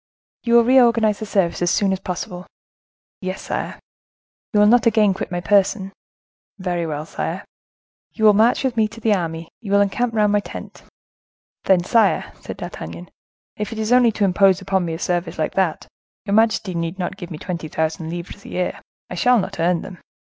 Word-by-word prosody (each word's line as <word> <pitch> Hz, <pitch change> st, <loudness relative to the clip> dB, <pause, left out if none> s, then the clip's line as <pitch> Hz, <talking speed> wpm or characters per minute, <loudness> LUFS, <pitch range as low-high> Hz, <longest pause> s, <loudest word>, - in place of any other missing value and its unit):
You 235 Hz, -1 st, +2 dB
will 235 Hz, -, +7 dB
reorganize 230 Hz, -4 st, +4 dB
the 215 Hz, -, -5 dB
service 190 Hz, -5 st, 0 dB
as 175 Hz, -, +2 dB
soon 195 Hz, +1 st, +2 dB
as 190 Hz, -, -3 dB
possible." 180 Hz, -1 st, -6 dB, 0.7 s
"Yes, 185 Hz, 0 st, -4 dB
sire." -, -, -4 dB, 0.7 s
"You 210 Hz, -, +2 dB
will 210 Hz, -, +6 dB
not 235 Hz, +2 st, +5 dB
again 215 Hz, -3 st, +4 dB
quit 185 Hz, -, -5 dB
my 175 Hz, 0 st, -2 dB
person." 195 Hz, +2 st, +2 dB, 0.6 s
"Very 175 Hz, -3 st, -2 dB
well, 150 Hz, -1 st, -4 dB
sire." -, -, -4 dB, 0.7 s
"You 220 Hz, -, -1 dB
will 210 Hz, -, +8 dB
march 225 Hz, +6 st, +3 dB
with 260 Hz, -3 st, 0 dB
me 220 Hz, -2 st, +3 dB
to 225 Hz, +2 st, -12 dB
the 220 Hz, -1 st, +2 dB
army, 165 Hz, -3 st, -3 dB
you 205 Hz, -4 st, -6 dB
will 200 Hz, -, +5 dB
encamp 225 Hz, +4 st, 0 dB
round 210 Hz, -1 st, +3 dB
my 205 Hz, -, +3 dB
tent." -, -, -9 dB, 0.8 s
"Then, 185 Hz, -2 st, +4 dB
sire," 220 Hz, 0 st, +2 dB
said -, -, -7 dB
D'Artagnan, 85 Hz, +2 st, -8 dB, 0.5 s
"if 210 Hz, +1 st, -4 dB
it 225 Hz, -, -6 dB
is 220 Hz, +1 st, -2 dB
only 250 Hz, -2 st, +5 dB
to 205 Hz, -, +1 dB
impose 190 Hz, 0 st, +4 dB
upon 190 Hz, -2 st, 0 dB
me 165 Hz, -1 st, -3 dB
a -, -, -5 dB
service 175 Hz, -1 st, -2 dB
like 155 Hz, -, -1 dB
that, 185 Hz, -4 st, 0 dB, 0.4 s
your 200 Hz, -, -2 dB
majesty 215 Hz, -3 st, +2 dB
need 170 Hz, +1 st, -3 dB
not 180 Hz, -2 st, -3 dB
give 175 Hz, -, -9 dB
me 160 Hz, -, -6 dB
twenty 170 Hz, -1 st, -5 dB
thousand 160 Hz, +1 st, -2 dB
livres 175 Hz, +4 st, -7 dB
a -, -, -11 dB
year. 180 Hz, 0 st, -3 dB, 0.3 s
I -, -, -8 dB
shall 250 Hz, 0 st, +3 dB
not 195 Hz, -, -3 dB
earn 170 Hz, +1 st, +1 dB
them." 185 Hz, -3 st, -10 dB
195 Hz, 195 wpm, -21 LUFS, 175-220 Hz, 0.8 s, will